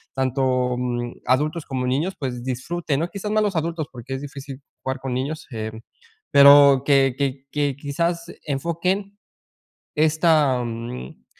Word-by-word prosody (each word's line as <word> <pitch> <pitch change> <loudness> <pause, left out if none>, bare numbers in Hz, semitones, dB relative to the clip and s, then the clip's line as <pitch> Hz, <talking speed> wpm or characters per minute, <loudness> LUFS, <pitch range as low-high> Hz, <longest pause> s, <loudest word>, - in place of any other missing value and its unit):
tanto, 130 -1 +1
mm, 120 -1 -3
adultos 150 +5 +1
como 130 -2 -3
niños 155 +9 0
pues, 125 -3 -4
disfruten, 140 +4 -2
¿no?, 170 - -2
quizás 205 +2 -5
más 215 0 +3
los 205 -3 -1
adultos, 160 -1 -2
porque, 130 +2 -6
es 130 - -5
difícil 140 -1 -8 0.2
jugar 130 0 -3
con 130 -1 -4
niños, 145 +5 -3
em, 110 -1 -5 0.5
pero 140 -1 +8
que 135 -3 +4
que 135 -1 -2
que 145 -2 0
quizás 170 +4 -2 0.2
enfoquen 170 +7 -2 0.8
esta, 155 -4 +3
mm, 115 - -7
140 Hz, 140 wpm, -23 LUFS, 130-160 Hz, 0.8 s, pero